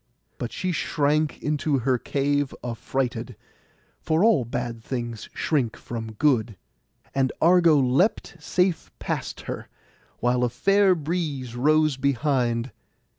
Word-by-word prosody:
But 120 -3 -4
she 185 - -2
shrank 150 -2 0
into 150 -1 +1
her 125 0 +1
cave 145 +1 0
affrighted—for 125 - -4
all 190 - +4
bad 120 -1 -4
things 120 -3 -5
shrink 135 -8 -1
from 115 -2 -6
good—and 125 +2 -2
Argo 170 -2 +5
leapt 145 - +1
safe 180 +3 0
past - - -4
her, - - -6 0.5
while 125 +1 +1
a 125 - +2
fair 195 +9 +3
breeze 150 -6 -3
rose 155 +2 +3
behind. 130 -3 0
135 Hz, 110 wpm, -25 LUFS, 120-155 Hz, 0.5 s, Argo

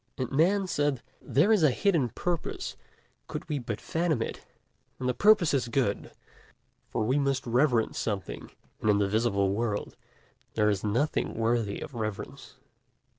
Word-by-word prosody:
And 130 - -3
Man 185 +8 +3
said: 145 -7 0 0.2
'There 165 +11 +3
is 215 -4 +5
a 155 - +6
hidden 155 - +1
purpose, 170 +8 -3 0.5
could - - -6
we 150 -3 -1
but 115 -4 -4
fathom 160 -7 0
it, - - -7 0.5
and 125 - -3
the 125 - +2
purpose 210 -5 +5
is 130 -4 +1
good; 115 -4 0 0.8
for - - -1
we 130 +6 +2
must 135 -2 0
reverence 120 -1 +2
something, 100 -5 -4 0.3
and 110 - +1
in 105 - +5
the 100 -1 +2
visible 100 -2 +1
world 105 -1 -2 0.6
there 105 -1 +3
is 100 -2 -2
nothing 120 +9 0
worthy 115 -2 0
of - - -7
reverence.' 110 -3 -5
125 Hz, 155 wpm, -28 LUFS, 110-150 Hz, 0.8 s, a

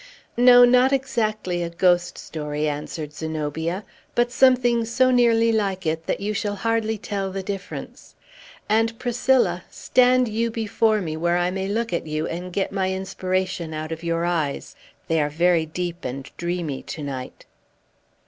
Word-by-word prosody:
"No, 245 0 +8
not 250 +2 +4
exactly 215 -9 -1
a 170 - -2
ghost 175 0 +2
story," 150 -1 -3
answered 150 +1 -4
Zenobia; 160 +4 -3 0.3
"but 240 0 +2
something 245 -2 +4
so 255 +3 +2
nearly 230 -2 +4
like 195 -4 -1
it 160 +1 -2
that - - -1
you 205 +2 -2
shall 205 -1 -2
hardly 220 +1 0
tell 195 -2 -3
the 195 0 -4
difference. 195 0 -7 0.5
And, 225 +1 +1
Priscilla, 240 -7 +1
stand 255 0 +3
you 230 +2 -1
before 220 -1 +1
me, 160 -4 -3
where 170 +2 +1
I 175 0 +1
may 190 +1 -3
look 225 +1 -2
at 170 - -2
you, 155 +1 -2
and 180 +2 -5
get 195 +2 -1
my 190 -1 0
inspiration 185 -3 -2
out 155 +1 -5
of 160 - -5
your 170 0 0
eyes. 160 -5 -2 0.3
They 165 -1 +2
are 145 - 0
very 165 +1 +2
deep 175 +1 -4
and 135 +2 -6
dreamy 170 -5 -3
to 155 - -7
night." 130 -3 -6
190 Hz, 160 wpm, -23 LUFS, 165-225 Hz, 0.5 s, No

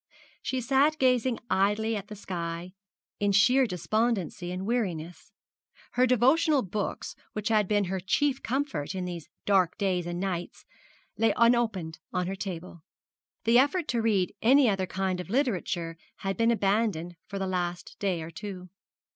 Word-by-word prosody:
She 260 -1 -2
sat 275 +5 +3
gazing 255 -3 +2
idly 210 +2 +1
at 205 -1 -5
the 210 - -8
sky, 175 -2 -5 0.5
in 205 0 +2
sheer 250 +6 +5
despondency 200 -2 -1
and 185 +1 -4
weariness. 180 -8 -3 0.6
Her 255 +1 +3
devotional 265 +4 +4
books, 200 +2 -3 0.2
which 210 0 -2
had 215 -3 +3
been 205 0 +2
her 190 0 -2
chief 270 +9 +1
comfort 245 - -2
in 185 -1 -2
these 175 -4 -6 0.2
dark 185 -4 +3
days 180 -3 0
and 175 0 -3
nights, 180 -2 -4 0.5
lay 225 -2 +3
unopened 225 -9 +2
on 180 0 0
her 190 +2 -3
table. 180 -3 -6 0.6
The 235 +2 +5
effort 290 +5 +2
to 235 - +1
read 200 -5 +1
any 265 +3 +6
other 195 -3 +1
kind 190 -1 -1
of 180 - -6
literature 185 - -1 0.3
had 195 0 0
been 230 0 +2
abandoned 200 -5 +1
for 200 - -5
the 195 - -1
last 175 -2 -3
day 185 -5 -1
or 160 - -8
two. 190 -2 -7
200 Hz, 155 wpm, -28 LUFS, 180-235 Hz, 0.6 s, any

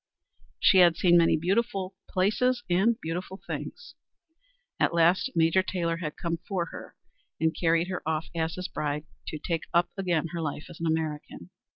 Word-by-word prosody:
She 190 - +6
had 170 -2 +6
seen 175 -1 +4
many 170 -1 +5
beautiful 195 +2 0 0.2
places 240 +7 +1
and 215 +6 +3
beautiful 180 +4 -5
things. - - -6 0.9
At - - +2
last 175 +9 +4
Major 165 +3 +4
Taylor 170 -3 -2
had 155 -3 -5
come 170 -1 -2
for 180 +1 -3
her - - -10 0.4
and 160 +1 +1
carried 165 0 +2
her 185 - -3
off 160 0 -1
as 165 -1 -2
his 185 0 -4
bride 150 -2 -3 0.2
to 155 - -4
take 165 +1 -3
up 170 0 +3
again 170 -4 0
her 170 0 -4
life 150 -1 -4
as 170 - -12
an 165 - -1
American. 155 - -3
170 Hz, 170 wpm, -27 LUFS, 160-185 Hz, 0.9 s, She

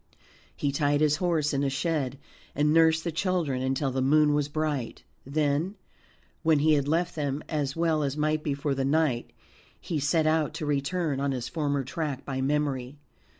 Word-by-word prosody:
He 140 - -1
tied 145 0 +1
his 150 -1 +3
horse 160 -4 0
in 140 0 +1
a 140 - +1
shed, 140 -2 -1 0.4
and 150 +1 +2
nursed 160 0 +4
the 170 - -2
children 160 -6 -1
until 135 +1 0
the 130 +1 -1
moon 150 +2 +4
was 145 -1 +1
bright. 145 -5 -2 0.2
Then, 150 +6 0 0.7
when 160 -2 +4
he 155 +2 +4
had 140 -2 +1
left 165 +3 +1
them 145 -1 -2
as 145 -3 -2
well 165 -2 +1
as 140 0 -2
might 155 0 +1
be 145 -2 -1
for 140 0 -1
the 135 0 -1
night, 140 -3 +1 0.5
he 160 - -3
set 155 +3 +2
out 155 -1 +1
to 155 - -4
return 145 +1 -1
on 140 0 0
his 125 -2 -3
former 145 -4 -1
track 140 0 -4
by 130 -1 -3
memory. 140 -1 -1
150 Hz, 185 wpm, -27 LUFS, 140-155 Hz, 0.7 s, nursed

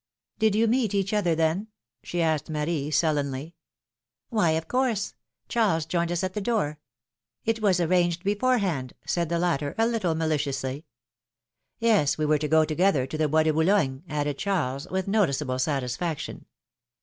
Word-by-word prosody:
Did 220 -2 +3
you 225 +2 +3
meet 225 -3 +1
each 200 +1 0
other 180 -6 +2
then? 165 +6 0 0.2
" - - -58
she 175 -1 -1
asked 160 -2 0
Marie, 150 -1 -1
sullenly. 150 -1 0 0.8
Why, 210 -8 +2
of 160 0 -2
course; 250 -4 0 0.3
Charles 200 - +1
joined 170 +1 -1
us 175 +1 -1
at 185 0 -2
the 210 - -3
door. 195 -9 -1 0.7
It 225 0 0
was 190 -4 +3
arranged 175 0 +1
beforehand," 200 - 0
said 170 -2 -1
the 170 - 0
latter, 155 -5 0
a 225 - +3
little 215 -8 0
mali 160 -1 +1
ciously. 135 +1 -3 0.9
Yes, 215 -11 +3
we 155 - 0
were 150 0 +3
to 150 - -1
go 160 +1 +4
together 155 -3 +2
to 135 - -7
the 155 0 +1
Bois 155 +2 +3
de 155 0 +2
Boulogne," 160 -5 +2
added 145 -1 -2
Charles, 145 -9 -1
with 190 0 -2
noticeable 150 -11 +1
satisfaction. 140 +3 -2
165 Hz, 165 wpm, -26 LUFS, 150-200 Hz, 0.9 s, go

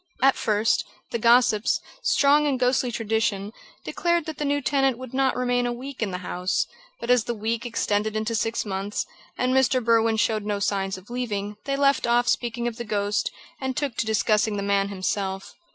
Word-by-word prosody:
At 270 0 +6
first, 215 0 +1 0.3
the 235 - -1
gossips, 235 -1 +4 0.2
strong 295 - +4
in 275 -3 +1
ghostly 250 0 +1
tradition, 220 -2 -1 0.3
declared 345 -2 0
that 315 -2 -6
the 295 - -1
new 285 0 +1
tenant 270 -2 +1
would 255 -1 -9
not 265 -1 +2
remain 245 -1 +1
a - - -1
week 260 +2 -7
in 215 - 0
the 180 - -3
house; 180 +1 0 0.3
but 235 - -1
as 250 -3 +4
the 240 - -2
week 225 +2 -2
extended 215 -2 0
into 215 +1 -1
six 225 +1 -1
months, 195 +1 -3 0.3
and 255 +1 +1
Mr. 265 0 +3
Berwin 230 -1 +3
showed 220 -1 +1
no 205 0 -1
signs 195 -1 -1
of 185 +5 -14
leaving, 210 -4 -3
they 275 - 0
left 275 -2 +2
off 240 +1 +3
speaking 240 0 0
of 235 -1 -4
the 235 - -4
ghost 205 -1 0 0.3
and 265 -1 -3
took 285 -5 -1
to 220 - -1
discussing 215 -1 +2
the 200 - -2
man 200 0 +1
himself. 195 0 -3
230 Hz, 195 wpm, -25 LUFS, 210-255 Hz, 0.3 s, At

